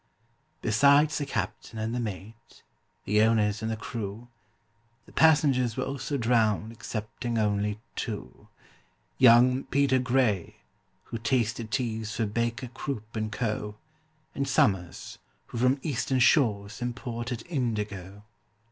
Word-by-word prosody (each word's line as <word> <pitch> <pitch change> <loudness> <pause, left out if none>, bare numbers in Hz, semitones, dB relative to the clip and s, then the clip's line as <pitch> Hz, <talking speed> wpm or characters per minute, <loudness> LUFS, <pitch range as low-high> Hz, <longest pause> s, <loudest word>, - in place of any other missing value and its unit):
Besides 140 +7 +4
the 145 - -3
captain 110 -1 -4
and 110 +1 -2
the 125 - -1
mate, 110 0 -8 0.4
the 105 +2 +3
owners 110 -2 +2
and 110 - -2
the 110 - -2
crew, 110 +1 -6 0.8
The - - -17
passengers 140 -7 +3
were 130 - 0
also 135 +1 -3
drowned 115 -3 +2
excepting 115 +1 -4
only 105 -1 0 0.2
two: 105 - -6 0.7
Young 125 +1 +6
PETER 140 -2 +2
GRAY, 120 -7 +1 0.5
who 115 - -6
tasted 115 -3 0
teas 110 -3 -2
for 115 - 0
BAKER, 115 +4 -2
CROOP, 115 -4 -6
AND 110 -1 -2
CO., 105 -1 -3 0.6
And 140 0 -2
SOMERS, 105 - 0 0.3
who 115 - -6
from 125 +3 +3
Eastern 135 -2 -1
shores 105 -6 +2
imported 120 -1 -4
indigo. 105 - -3
115 Hz, 120 wpm, -28 LUFS, 105-130 Hz, 0.8 s, Young